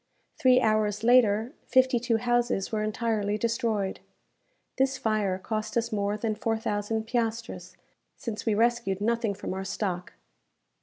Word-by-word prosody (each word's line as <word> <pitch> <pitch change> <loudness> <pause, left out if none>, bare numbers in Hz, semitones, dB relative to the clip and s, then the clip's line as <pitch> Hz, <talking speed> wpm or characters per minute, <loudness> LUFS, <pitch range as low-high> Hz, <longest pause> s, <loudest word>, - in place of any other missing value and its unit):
Three 255 -1 +5
hours 215 -2 +1
later, 230 0 +4
fifty 260 -1 +4
two 230 -1 +1
houses 240 -3 0
were 215 -1 -1
entirely 215 -1 -1
destroyed. 225 -4 -1 0.8
This 265 0 +2
fire 210 -4 0
cost 215 +3 -3
us 230 0 0
more 205 0 -1
than 220 0 -1
four 225 +1 -1
thousand 220 0 -2
piastres, 225 -6 -3 0.4
since 220 -2 -5
we 220 -3 +1
rescued 230 -3 +1
nothing 230 -1 0
from - - -5
our 190 0 -4
stock. 185 -2 -3
220 Hz, 140 wpm, -27 LUFS, 205-235 Hz, 0.8 s, Three